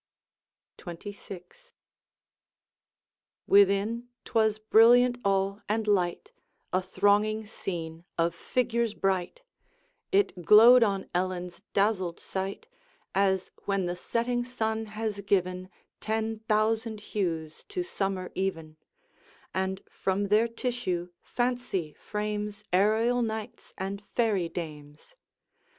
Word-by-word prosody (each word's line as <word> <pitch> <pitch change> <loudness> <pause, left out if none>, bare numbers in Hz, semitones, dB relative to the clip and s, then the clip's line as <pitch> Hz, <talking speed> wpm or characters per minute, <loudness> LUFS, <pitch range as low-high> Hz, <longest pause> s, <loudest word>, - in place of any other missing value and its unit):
XXVI. 200 - -10 1.7
Within 200 +4 +3 0.2
't - - -13
was 220 -1 +3
brilliant 240 +3 +5
all 195 +1 +1
and 220 +1 0
light, 185 -5 0 0.4
A 185 - +3
thronging 205 +3 +2
scene 165 -5 -6
of 170 0 +2
figures 235 -3 -1
bright; 195 - -1 0.7
It 385 - +1
glowed 230 +6 +8
on 200 -4 +1
Ellen's 180 0 -2
dazzled 195 -4 +1
sight, 190 +1 -4 0.5
As 190 -1 +1
when 195 -2 0
the 175 0 -2
setting 240 +6 -1
sun 220 -3 -2
has 215 -1 -4
given 185 -2 0 0.3
Ten 220 0 -2
thousand 220 +1 +1
hues 165 -6 -2
to 370 -3 -3
summer 195 - -3
even, 165 -5 -3 0.8
And 190 0 -2
from 195 +1 -1
their 215 +3 +4
tissue 230 -7 -3
fancy 240 -10 -2
frames 210 0 -4
Aerial 220 +6 +3
knights 220 -2 -5
and 195 +1 -4
fairy 205 -8 +1
dames. 150 - -8
205 Hz, 100 wpm, -28 LUFS, 185-225 Hz, 1.7 s, glowed